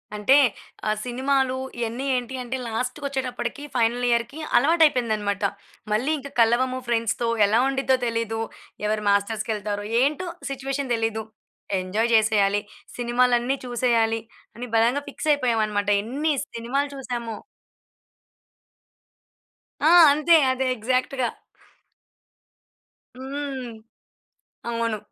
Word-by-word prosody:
అంటే 210 +7 +4 0.5
ఆ - - +3
సినిమాలు 260 +1 0 0.2
ఇయన్ని 235 +3 -3
ఏంటి 250 +1 -3
అంటే, 255 +2 -3
లాస్ట్‌కొచ్చేటప్పటికి 255 +3 -3
ఫైనల్ 240 +1 +1
ఇయర్‌కి 235 +6 0 0.2
అలవాటయిపోయిందన్నమాట. 240 - +2 0.5
మళ్ళీ 245 +8 +1
ఇంకా 280 0 -9
కలవము 255 +3 +2
ఫ్రెండ్స్ 230 -2 +1
తో 235 - +1 0.2
ఎలా 215 +3 +3
ఉండిద్దో 270 -1 +1
తెలియదు. 230 -1 -2 0.4
ఎవరు 210 0 0
మాస్టర్స్‌కెళ్తారో 205 0 -1 0.2
ఏంటో 300 +7 0 0.2
సిచ్యువేషన్ 270 -1 -2
తెలియదు. 225 -1 -1 0.6
ఎంజాయ్ 210 +6 -1
చేసేయాలి, 205 -2 +3 0.4
సినిమాలన్ని 245 +1 +2
చూసేయాలి, 235 -2 +1 0.4
అని 245 - -6
బలంగా 235 +5 +3
ఫిక్స్ 305 - -4
అయిపోయామన్నమాట. 220 -7 0 0.2
ఎన్ని 290 +7 -1 0.2
సినిమాలు 265 +5 -1
చూసామో. 240 -4 -5 2.5
ఆ! 310 - +6 0.2
అంతే 305 +4 +4 0.2
అదే 260 +1 -1
ఎగ్జాక్ట్‌గా. 255 +2 0 1.9
హ్మ్. 265 -2 -5 0.9
అవును. 230 -2 -1
240 Hz, 95 wpm, -24 LUFS, 225-265 Hz, 2.5 s, ఆ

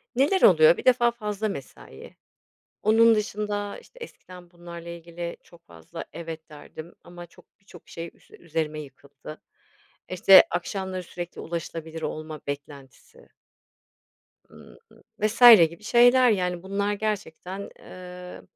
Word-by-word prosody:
Neler 290 +9 +2
oluyor, 160 -2 +6
bir - - -8
defa 240 -1 +4
fazla 215 -2 -4
mesai. 135 - -10 0.7
Onun 225 +2 +5
dışında, 210 -1 -3
işte, - - -18
eskiden 180 - -15
bunlarla 170 -1 -11
ilgili 170 0 -7
çok 170 -1 -21
fazla 80 -2 -10
"evet" 165 -1 -8
derdim 155 +2 -12
ama 175 0 -11
çok, 170 - -24
birçok 190 -4 -17
şey 165 0 -8
üs - - -27
üzerime 155 -2 -4
yıkıldı. 140 +1 -13 0.7
İşte, 185 +1 +7
akşamları 185 +1 -4
sürekli 175 0 -8
ulaşılabilir 165 -1 -6
olma 155 0 -6
beklentisi 145 - -10 1.2
Imm, - - -16 0.4
vs. 215 +3 -2 0.3
gibi 170 +6 -15
şeyler, 245 +3 +5
yani, 180 -3 -2
bunlar 200 +2 -2
gerçekten, 200 -2 -5
eee, 180 - -11
175 Hz, 120 wpm, -25 LUFS, 160-205 Hz, 1.2 s, İşte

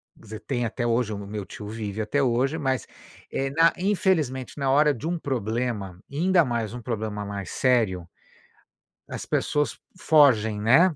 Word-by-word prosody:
quer - - -22
dizer, 110 0 -8
tem 120 -3 -2
até 120 +1 -2
hoje, 115 -2 +1
meu 100 0 -6
tio 105 - -9
vive 105 -1 -4
até 140 +6 0
hoje, 130 +5 +1
mas, 130 -4 -1 0.4
eh, 135 0 -1
na 165 +3 +4
infelizmente 175 -10 0
na 135 -2 0
hora 150 +2 +4
de 135 +4 -8
um 170 0 -1
problema, 115 - -3
e 140 - -8
ainda 175 0 +4
mais 115 -3 -2
um 125 - -6
problema 110 -3 -3
mais 100 -1 -5
sério, 110 -9 +1 1.0
as - - -6
pessoas 150 0 0 0.2
fogem, 115 -11 +4
né. 155 - +5
125 Hz, 165 wpm, -25 LUFS, 110-145 Hz, 1.0 s, né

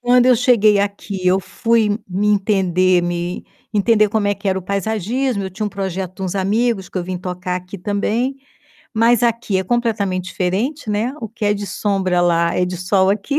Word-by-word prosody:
Quando 245 0 +4
eu 255 -1 +6
cheguei 220 -4 +4
aqui 200 -1 -3
eu 185 +1 +4
fui 220 0 +1
me 195 +3 0
entender 185 -3 +2
me 175 0 -3 0.3
entender 215 +1 +4
como 210 0 0
é 205 - +1
que 200 - -4
era 190 0 +1
o - - -8
paisagismo, 220 +5 -1
eu 190 - -5
tinha 210 +3 -3
um - - -1
projeto 190 -2 -4
de 195 - -7
uns 185 0 -2
amigos 200 +1 0
que - - -10
eu 175 - -3
vim 185 0 -4
tocar 180 0 -4
aqui 180 +2 -8
também, 210 +7 -1 0.6
mas 230 +1 +3
aqui 230 -4 +1
é 190 - -2
completamente 210 -5 0
diferente, 210 - -2
né, 220 +6 -1
o 225 - -5
que 220 0 -6
é 205 - +3
de 205 0 -5
sombra 190 -4 0
lá 170 -1 +2
é 180 - +2
de 180 0 -4
sol 190 +2 +2
aqui. 215 +8 -1
200 Hz, 200 wpm, -19 LUFS, 185-225 Hz, 0.6 s, eu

